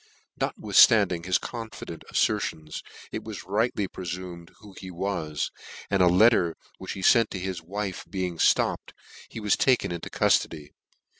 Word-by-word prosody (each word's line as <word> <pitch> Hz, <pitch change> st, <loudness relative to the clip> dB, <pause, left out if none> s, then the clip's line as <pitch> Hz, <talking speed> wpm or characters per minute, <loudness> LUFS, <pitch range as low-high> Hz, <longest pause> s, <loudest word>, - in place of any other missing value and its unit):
Notwithftandino; 95 Hz, -6 st, +4 dB
his 90 Hz, -, +3 dB
confident 115 Hz, -8 st, -8 dB
afiertions 75 Hz, -1 st, -1 dB, 0.3 s
it -, -, -5 dB
was -, -, -7 dB
rightly 105 Hz, +1 st, 0 dB
prefumed 90 Hz, -2 st, -7 dB
who 100 Hz, -2 st, -14 dB
he 95 Hz, -, -8 dB
was, 85 Hz, -4 st, -3 dB, 0.4 s
and 100 Hz, -2 st, +3 dB
a 90 Hz, -, +6 dB
letter 90 Hz, -2 st, +4 dB, 0.2 s
which -, -, -5 dB
he 95 Hz, -, -7 dB
fent 115 Hz, 0 st, +5 dB
to 95 Hz, -, -5 dB
his 90 Hz, -2 st, -4 dB
wife 95 Hz, +2 st, -5 dB
being 90 Hz, -4 st, -3 dB, 0.2 s
(lopped, -, -, -3 dB, 0.3 s
he -, -, -7 dB
was 105 Hz, -2 st, +2 dB
taken 130 Hz, -8 st, +2 dB
into 85 Hz, -1 st, -5 dB
cuftody. 75 Hz, -3 st, +1 dB
95 Hz, 145 wpm, -26 LUFS, 85-105 Hz, 0.4 s, a